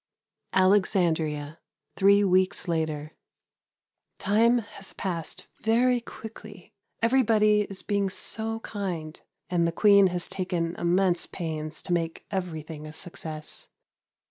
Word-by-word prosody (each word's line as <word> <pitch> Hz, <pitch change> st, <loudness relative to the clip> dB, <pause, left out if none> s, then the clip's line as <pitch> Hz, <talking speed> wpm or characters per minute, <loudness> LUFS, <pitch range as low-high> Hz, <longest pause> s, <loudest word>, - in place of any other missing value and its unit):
Alexandria, 170 Hz, -6 st, +2 dB, 0.4 s
three 200 Hz, +1 st, +5 dB
weeks 185 Hz, 0 st, +2 dB
later. 155 Hz, -2 st, -2 dB, 1.0 s
Time 225 Hz, +5 st, +3 dB
has 205 Hz, -3 st, -5 dB
passed 170 Hz, -5 st, -4 dB, 0.2 s
very 240 Hz, +2 st, +3 dB
quickly. 215 Hz, -4 st, -11 dB, 0.3 s
Everybody 215 Hz, -4 st, +4 dB
is 195 Hz, -1 st, -5 dB
being 200 Hz, -2 st, 0 dB
so 225 Hz, +3 st, -3 dB
kind, 175 Hz, -8 st, -5 dB, 0.3 s
and 170 Hz, -2 st, +2 dB
the -, -, 0 dB
Queen 200 Hz, +2 st, +6 dB
has 175 Hz, -1 st, -1 dB
taken 175 Hz, -3 st, -2 dB
immense 175 Hz, 0 st, +2 dB
pains 155 Hz, -3 st, -4 dB
to 180 Hz, -, -1 dB
make 165 Hz, -1 st, -2 dB
everything 160 Hz, -5 st, -4 dB
a 155 Hz, -, -9 dB
success. 160 Hz, -2 st, -4 dB
185 Hz, 110 wpm, -27 LUFS, 165-205 Hz, 1.0 s, Queen